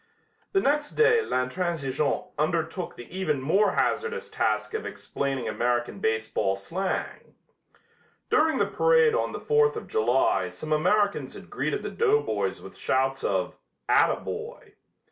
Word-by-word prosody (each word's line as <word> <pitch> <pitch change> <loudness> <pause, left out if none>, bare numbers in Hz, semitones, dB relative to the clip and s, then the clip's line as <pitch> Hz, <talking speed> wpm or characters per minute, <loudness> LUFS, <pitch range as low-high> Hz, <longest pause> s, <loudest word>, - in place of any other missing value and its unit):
The 390 - +4
next 295 -2 +1
day 455 0 +4
L'Intransigeant 145 - -1
undertook 165 +3 -1
the 120 - -10
even 155 -7 0
more 195 +10 +2
hazardous 465 +1 -1
task - - 0
of 440 - -2
explaining 135 -2 -3
American 120 -1 -1
baseball 110 -2 0
slang. 175 - -4 1.0
During 315 0 +3
the - - +3
parade 475 -1 +4
on 485 - 0
the - - -5
Fourth 450 0 +3
of 445 - -6
July 110 -5 +2
some 155 +13 -4
Americans 200 +6 +1
had - - -12
greeted - - -2
the - - -4
doughboys 440 -1 0
with - - -11
shouts 135 +1 0
of 95 -2 -1 0.3
"ataboy." - - 0
165 Hz, 130 wpm, -26 LUFS, -, 1.0 s, The